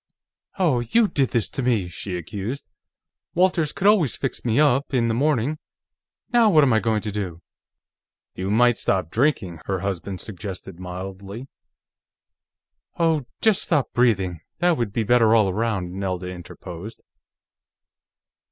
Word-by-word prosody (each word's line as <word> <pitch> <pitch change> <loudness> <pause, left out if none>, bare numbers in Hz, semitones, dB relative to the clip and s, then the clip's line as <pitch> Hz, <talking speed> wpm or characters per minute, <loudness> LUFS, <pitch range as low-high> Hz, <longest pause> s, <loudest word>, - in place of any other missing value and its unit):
"Oh, 165 -10 +2
you 215 - +3
did 135 -8 +1
this 115 -3 0
to - - -4
me!" 115 -7 +1
she 90 +1 -5
accused. 100 - -5 0.7
"Walters 175 -4 +2
could - - -5
always 195 - +4
fix 135 - -4
me 120 +2 +1
up, 140 -2 +3
in 115 -2 +2
the - - +1
morning. 145 +2 +1 0.7
Now 235 -2 +6
what 155 -6 +6
am 130 -4 +4
I 110 - +4
going 110 -1 0
to 105 - -4
do?" 95 -5 -5 0.9
"You 95 +1 -4
might 120 +3 +4
stop 90 -4 0
drinking," 110 - 0
her 95 -2 -1
husband 95 -1 -3
suggested 95 -3 -7
mildly. 95 +6 -7 1.5
"Oh, 160 -6 +1
just 220 -4 +3
stop 150 -6 0
breathing; 95 -9 +1 0.2
that 175 0 +3
would 120 -7 -2
be 115 - 0
better 115 0 +4
all 110 -3 +4
around," 95 -3 -1
Nelda 95 -2 -3
interposed. 90 +2 -9
115 Hz, 145 wpm, -23 LUFS, 95-140 Hz, 1.5 s, Now